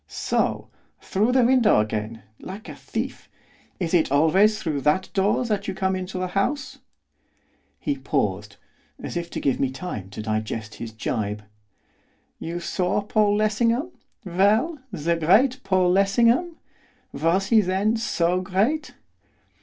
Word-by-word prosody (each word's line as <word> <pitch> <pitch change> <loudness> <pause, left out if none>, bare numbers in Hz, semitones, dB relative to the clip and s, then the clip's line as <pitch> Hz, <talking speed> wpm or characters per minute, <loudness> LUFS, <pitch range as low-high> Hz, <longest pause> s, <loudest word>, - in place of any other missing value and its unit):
'So! - - -1 0.3
Through 215 +5 0
the 255 -1 +4
window 245 - +4
again! 110 +1 -3 0.2
like 200 +4 -9
a - - -7
thief! - - -5 0.5
Is 175 -2 -2
it 165 -6 +3
always 185 +9 +4
through 150 -7 -2
that 150 +7 +1
door 205 +5 +1
that 210 -4 -2
you 190 - -3
come 190 0 0
into 185 0 -4
a - - -1
house?' 255 +9 -2 1.0
He 145 - -2
paused, 105 -7 -2 0.4
as - - -6
if 170 0 -3
to - - -4
give 135 - 0
me 135 - +1
time 130 - -6
to 105 - -7
digest 110 0 -3
his 115 - -5
gibe. 105 -2 -3 1.0
'You 170 +2 -4
saw 180 +3 -1
Paul 210 0 +2
Lessingham, 230 - +1 0.3
well? 210 - +2
the 170 -2 -1
great 230 - +3
Paul 185 -2 +2
Lessingham! 230 - +3 0.6
Was 185 +5 +1
he, 225 -2 +6
then, 195 +4 +1
so 180 -5 0
great? 205 +12 -1
185 Hz, 140 wpm, -24 LUFS, 150-215 Hz, 1.0 s, he